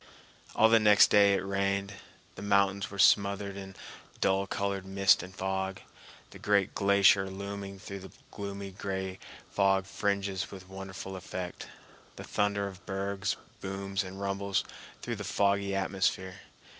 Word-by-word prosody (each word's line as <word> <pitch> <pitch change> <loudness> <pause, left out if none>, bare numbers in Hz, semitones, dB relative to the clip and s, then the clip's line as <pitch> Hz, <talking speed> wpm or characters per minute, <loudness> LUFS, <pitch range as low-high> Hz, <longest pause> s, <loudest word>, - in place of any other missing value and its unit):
All 110 - +6
the 115 0 +6
next 105 -1 +6
day 100 -1 +6
it 95 - -2
rained. 100 0 -1 0.4
The - - -10
mountains 100 -1 +2
were 100 - -9
smothered 100 +1 +3
in 95 -1 -8 0.4
dull 95 0 +2
colored 100 0 -2
mist 95 0 +4
and 90 - -9
fog, 95 0 -2 0.5
the - - -12
great 100 -2 +2
glacier 100 -1 +4
looming 100 0 -6
through 100 +1 -8
the 95 -2 -11 0.2
gloomy 100 -1 -6
gray 95 0 -4 0.3
fog 95 -1 +2
fringes 100 -1 -1
with 95 -1 -11
wonderful 95 0 -7
effect. 90 -1 -6 0.5
The - - -8
thunder 100 -1 0
of 95 0 -10
bergs 100 0 -2 0.2
booms 95 +1 -3
and 95 +1 -8
rumbles 100 0 -1 0.4
through - - -3
the - - -5
foggy 100 -1 +1
atmosphere. 95 -1 0
100 Hz, 145 wpm, -30 LUFS, 95-100 Hz, 0.5 s, All